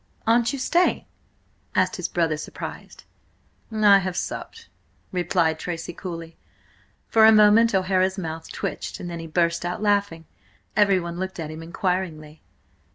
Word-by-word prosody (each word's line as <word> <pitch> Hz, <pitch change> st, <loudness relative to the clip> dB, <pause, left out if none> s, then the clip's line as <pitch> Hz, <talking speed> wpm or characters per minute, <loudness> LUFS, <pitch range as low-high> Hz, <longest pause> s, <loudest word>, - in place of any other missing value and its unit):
"Aren't 235 Hz, +2 st, +3 dB
you 280 Hz, -, -4 dB
staying?" 345 Hz, +7 st, +1 dB, 0.7 s
asked -, -, +2 dB
his -, -, -2 dB
brother, 165 Hz, -3 st, 0 dB
surprised. 150 Hz, -, -8 dB, 0.7 s
"I 210 Hz, -2 st, +6 dB
have 185 Hz, -2 st, -4 dB
supped," 455 Hz, 0 st, -5 dB, 0.4 s
replied 175 Hz, -3 st, +1 dB
Tracy 170 Hz, 0 st, -5 dB
coolly. 165 Hz, -2 st, -7 dB, 0.7 s
For 225 Hz, -, +4 dB
a 220 Hz, -, +9 dB
moment 215 Hz, +1 st, +5 dB
O'Hara's 190 Hz, 0 st, +1 dB
mouth 165 Hz, -3 st, -6 dB
twitched, -, -, -5 dB
and 175 Hz, -, -6 dB
then 170 Hz, -, -5 dB
he 165 Hz, -, -7 dB
burst 170 Hz, +1 st, 0 dB
out 175 Hz, +4 st, -3 dB
laughing. 200 Hz, -6 st, 0 dB, 0.5 s
Everyone 185 Hz, -5 st, +2 dB
looked 190 Hz, -1 st, -5 dB
at 155 Hz, -2 st, -4 dB
him 160 Hz, +1 st, -8 dB
inquiringly. 165 Hz, -3 st, -3 dB
180 Hz, 140 wpm, -24 LUFS, 165-205 Hz, 0.7 s, a